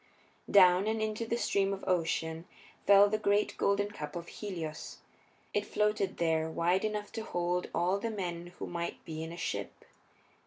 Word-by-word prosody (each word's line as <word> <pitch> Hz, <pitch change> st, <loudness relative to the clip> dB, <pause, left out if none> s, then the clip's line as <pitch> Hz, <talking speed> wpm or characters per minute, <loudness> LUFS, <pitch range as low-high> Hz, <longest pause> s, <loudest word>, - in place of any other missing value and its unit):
Down, 185 Hz, 0 st, +6 dB
and 220 Hz, 0 st, 0 dB
into 220 Hz, +1 st, -2 dB
the 235 Hz, -, 0 dB
Stream 195 Hz, -4 st, +1 dB
of 195 Hz, -, -6 dB
Ocean 165 Hz, -2 st, 0 dB, 0.4 s
fell 200 Hz, 0 st, +8 dB
the 215 Hz, +1 st, 0 dB
great 205 Hz, 0 st, +2 dB
golden 205 Hz, +1 st, +1 dB
cup 150 Hz, -6 st, -7 dB
of 170 Hz, 0 st, -6 dB
Helios. 170 Hz, -7 st, -6 dB, 0.6 s
It 205 Hz, -, +1 dB
floated 210 Hz, -2 st, 0 dB
there 160 Hz, -1 st, +1 dB
wide 175 Hz, +3 st, +1 dB
enough 210 Hz, -1 st, -2 dB
to 225 Hz, -, -5 dB
hold 175 Hz, -2 st, -1 dB
all 180 Hz, +3 st, +1 dB
the 230 Hz, -, -2 dB
men 175 Hz, -5 st, -4 dB
who -, -, -4 dB
might 170 Hz, 0 st, -5 dB
be 160 Hz, -1 st, -5 dB
in 160 Hz, -, -6 dB
a 170 Hz, -, -8 dB
ship. -, -, -4 dB
190 Hz, 170 wpm, -31 LUFS, 170-205 Hz, 0.6 s, fell